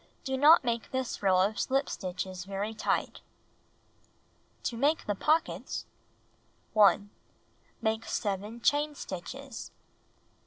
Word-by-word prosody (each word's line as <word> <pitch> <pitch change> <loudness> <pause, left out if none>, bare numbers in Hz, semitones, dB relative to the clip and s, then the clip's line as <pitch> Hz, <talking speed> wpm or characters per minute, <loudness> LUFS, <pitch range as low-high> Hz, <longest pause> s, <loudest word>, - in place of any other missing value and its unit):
Do 265 -1 -1
not 295 +4 +7
make 235 -2 -1
this 260 -1 -3
row 190 -2 +4
of 205 +3 +1
slip 270 +1 +1
stitches 185 0 -5
very 200 +2 -3
tight. - - -1 1.4
To 235 - -2
Make 290 +7 +1
the 205 - 0
Pockets 310 - 0 0.9
1. 205 -1 +5 0.7
Make 220 0 0
7 205 +3 -3
chain 295 +4 +2
stitches. 265 +8 -7
220 Hz, 110 wpm, -30 LUFS, 195-270 Hz, 1.4 s, not